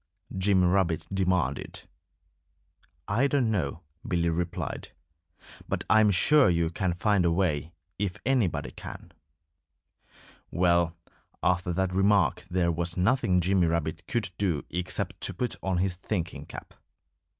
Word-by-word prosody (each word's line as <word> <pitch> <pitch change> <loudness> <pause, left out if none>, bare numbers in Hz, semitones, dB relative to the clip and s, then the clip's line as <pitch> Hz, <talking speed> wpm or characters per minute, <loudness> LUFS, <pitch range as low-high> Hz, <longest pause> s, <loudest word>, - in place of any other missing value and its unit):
Jimmy 95 -1 +3
Rabbit 90 -3 +1
demanded. 90 -8 -1 1.2
"I 120 +8 +2
don't 135 -5 +1
know," 85 -6 -2 0.3
Billy 85 -2 +1
replied. 85 +1 -3 0.8
"But - - -1
I 110 - +7
am 110 -1 +5
sure 135 +8 +5
you 85 -1 +1
can 90 0 -1
find 100 0 +2
a 85 - +3
way, 85 -4 0 0.3
if 95 -3 -2
anybody 125 -9 0
can." - - -10 1.4
Well, 85 -1 +2 0.5
after 90 0 +1
that 95 +1 0
remark 100 +1 +3
there 90 -1 +1
was 85 +2 -2
nothing 95 -2 +2
Jimmy 90 0 +2
Rabbit 80 -1 -2
could 120 -9 -2
do 90 -8 0
except 90 +1 -2
to - - -2
put 125 -1 -2
on 95 -2 -1
his 95 +1 +1
thinking 90 -3 -4
cap. - - -10
90 Hz, 130 wpm, -27 LUFS, 85-100 Hz, 1.4 s, I